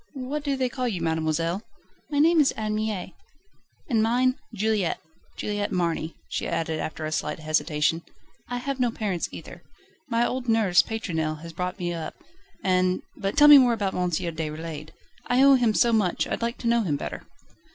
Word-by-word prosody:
"What 275 +3 -4
do 280 -2 -1
they 260 -1 +1
call 250 0 -3
you, 200 -7 -2
mademoiselle?" 165 +2 -1 0.5
"My 290 - -2
name 320 +2 +5
is 280 - +4
Anne 215 -1 -3
Mie." 215 -4 -3 0.7
"And 230 -5 +2
mine, 250 +3 +3 0.2
Juliette 215 -4 0 0.4
Juliette 205 -1 -2
Marny," 170 -3 -1
she - - -3
added 165 -2 -2
after 155 0 -4
a 155 - -3
slight - - -2
hesitation. 155 0 0 0.5
"I 245 - -2
have 270 +2 -3
no 245 -1 +2
parents 205 -6 -2
either. - - -10 0.5
My 235 0 +2
old 250 -1 -3
nurse, 205 -6 +5
Pétronelle, 160 -9 -3
has 165 0 -8
brought 180 +3 -3
me 175 -2 -2
up, 165 -2 -5 0.5
and 185 -1 +2
But 195 0 -3
tell 295 - +8
me 295 -1 +11
more 245 -2 +4
about 205 -4 -1
M. 180 0 0
Déroulède 160 -2 -4 0.4
I 250 +2 +4
owe 275 0 +8
him 240 -5 +3
so 235 -1 +4
much, 205 -6 +1
I'd - - -3
like 235 +1 -2
to 235 - -4
know 235 0 +3
him 165 -9 0
better." - - -5
205 Hz, 185 wpm, -25 LUFS, 165-240 Hz, 0.7 s, me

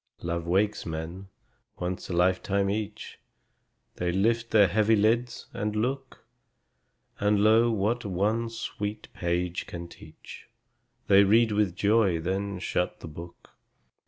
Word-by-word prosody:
Love 85 0 -3
wakes 100 +4 +1
men, 80 +4 -6 0.5
once 90 +2 -4
a - - -3
lifetime 95 +3 +1
each; 105 0 -5 0.8
They 90 0 -1
lift 115 +5 +1
their 105 -3 +5
heavy 110 +4 +3
lids, 115 +3 +1
and 105 0 -3
look; 130 +4 -3 0.9
And, 105 0 +2
lo, 110 +2 +5
what 110 +2 0
one 105 +4 0
sweet 105 -2 -6
page 85 0 -2
can 85 0 -7
teach, 80 -2 -13 0.6
They 100 0 +6
read 110 +3 +4
with 105 -4 +1
joy, 100 -3 +2
then 95 +3 -2
shut 90 -1 -2
the - - -7
book. 85 +3 -11
100 Hz, 130 wpm, -27 LUFS, 90-110 Hz, 0.9 s, They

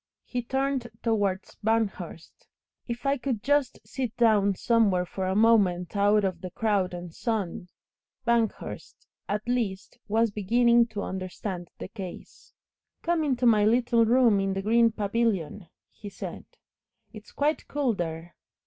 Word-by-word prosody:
He 245 - -3
turned 265 0 -1 0.2
towards 205 -4 -1
Banghurst. 205 -7 -2 0.4
"If 240 +2 -5
I 275 +1 +2
could 250 -5 -3
just 285 -1 +1
sit 255 -4 -4
down 210 -4 +4
somewhere 200 -5 +2
for 190 +1 -4
a 190 - 0
moment 200 -5 +3
out 205 +1 +3
of 185 -3 -2
the 185 - -5
crowd 200 -1 0
and 175 -1 -8
sun 205 -6 -3 0.3
" 265 - -55
Banghurst, 235 -2 -2 0.2
at 210 +3 -2
least, 225 -6 -2
was 225 +1 +2
beginning 235 +3 +3
to 210 -3 -5
understand 185 -1 -5
the - - -6
case. 190 -3 -10 0.5
"Come 340 -1 +1
into 255 -4 0
my 215 -3 +5
little 235 +1 +3
room 230 -2 +4
in 195 0 0
the 195 0 -3
green 230 +2 +4
pavilion," 205 -5 -1 0.2
he 205 - -10
said. - - -8 0.7
"It's 215 -1 -12
quite 300 +2 -1
cool 280 -5 0
there." 170 -2 -5
215 Hz, 145 wpm, -27 LUFS, 190-235 Hz, 0.7 s, my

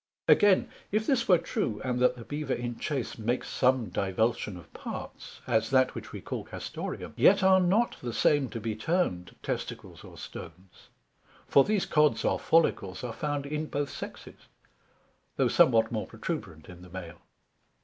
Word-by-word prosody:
Again, 205 -3 +5 0.2
If 215 +2 +1
this 250 -3 +1
were 180 - +7
true, 110 -8 -2
and 125 -1 -1
that 125 0 +3
the 115 - -9
Bever 145 -2 -2
in 120 -1 -5
chase 135 -6 -3
makes 120 +3 -1
some 130 -4 +2
divulsion 100 +1 -1
of 85 - -15
parts, - - -8
as 110 -3 +1
that 130 -1 +3
which - - -8
we - - -7
call - - -5
Castoreum; - - -6
yet - - +5
are 190 0 +6
not 195 +6 +2
the 120 - -3
same 140 +2 +2
to 115 - -5
be 110 0 -3
termed 110 - -1
Testicles - - -5
or - - -13
Stones; 90 0 -11 0.6
for 140 - +6
these 210 +2 0
Cods 150 -2 +2
or - - +1
Follicles 130 - +1
are 120 -2 -4
found 145 +1 -2
in 150 +2 -3
both 145 -1 -2
Sexes, - - -9 0.9
though - - +2
somewhat 115 -2 +4
more 110 -2 -2
protuberant 80 0 -6
in 90 -1 -12
the 90 - -13
Male. 85 -2 -9
125 Hz, 170 wpm, -29 LUFS, 110-150 Hz, 0.9 s, were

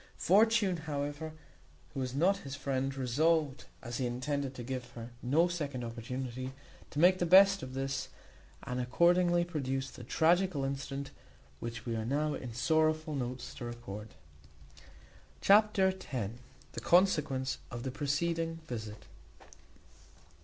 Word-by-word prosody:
Fortune, 210 -1 +4
however, 150 0 -4 0.6
who 140 - -4
was 130 -1 -3
not 185 +7 +3
his 140 -7 -7
friend, 135 -1 -2
resolved, 145 +3 +1 0.2
as 120 0 -4
he 125 - 0
intended 135 +2 -2
to 125 - -6
give 125 0 -5
her 115 0 -8
no 150 +8 +3
second 145 -8 -3
opportunity, 125 +2 -5 0.4
to - - -10
make 180 +4 +5
the 175 - +2
best 195 +2 +7
of 130 0 -7
this; 135 0 -2 0.6
and 125 0 -3
accordingly 175 +6 +3
produced 135 -5 -3
the 125 - -9
tragical 165 +2 +2
incident 135 0 -4 0.5
which 115 +4 -6
we 115 -2 -2
are 110 - -2
now 145 +5 0
in 125 -4 -5
sorrowful 155 +5 +1
notes 125 -2 -4
to - - -8
record. 110 -3 -7 1.2
Chapter 205 -1 +5 0.2
x. 115 -5 -2 0.4
The - - -5
consequence 150 -8 +2
of 120 -1 -6
the 130 - -3
preceding 165 +4 -1
visit. 110 -4 -6
140 Hz, 135 wpm, -32 LUFS, 125-165 Hz, 1.2 s, best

